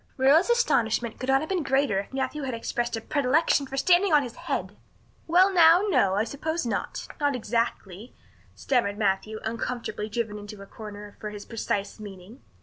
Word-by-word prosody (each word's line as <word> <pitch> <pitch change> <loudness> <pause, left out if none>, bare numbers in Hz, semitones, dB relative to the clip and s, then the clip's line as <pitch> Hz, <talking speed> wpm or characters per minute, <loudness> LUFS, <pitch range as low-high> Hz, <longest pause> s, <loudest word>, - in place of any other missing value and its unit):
Marilla's 280 - +4
astonishment 235 - +1
could 255 - -4
not 270 0 +4
have 315 - -5
been 375 -3 0
greater 270 -7 +1
if 200 - -7
Matthew 265 +3 -3
had 260 -3 -3
expressed 235 0 -2
a - - -6
predilection 285 +2 +1
for 270 - -6
standing 360 +6 +4
on 295 -2 +5
his 240 -2 -7
head. - - -4 0.5
"Well, 370 +4 +4
now, 340 +1 +6
no, 225 - +3
I 205 - +2
suppose 315 +6 -3
not 235 - -3
not 285 -2 +1
exactly," 225 -3 -3 0.4
stammered 235 -6 0
Matthew, 210 +1 -1
uncomfortably 230 -1 -4
driven 210 -1 -3
into 205 0 -10
a - - -11
corner 210 -1 -10
for 210 - -5
his 210 -1 -9
precise 205 -2 -3
meaning. 205 +4 -11
240 Hz, 175 wpm, -26 LUFS, 210-285 Hz, 0.5 s, now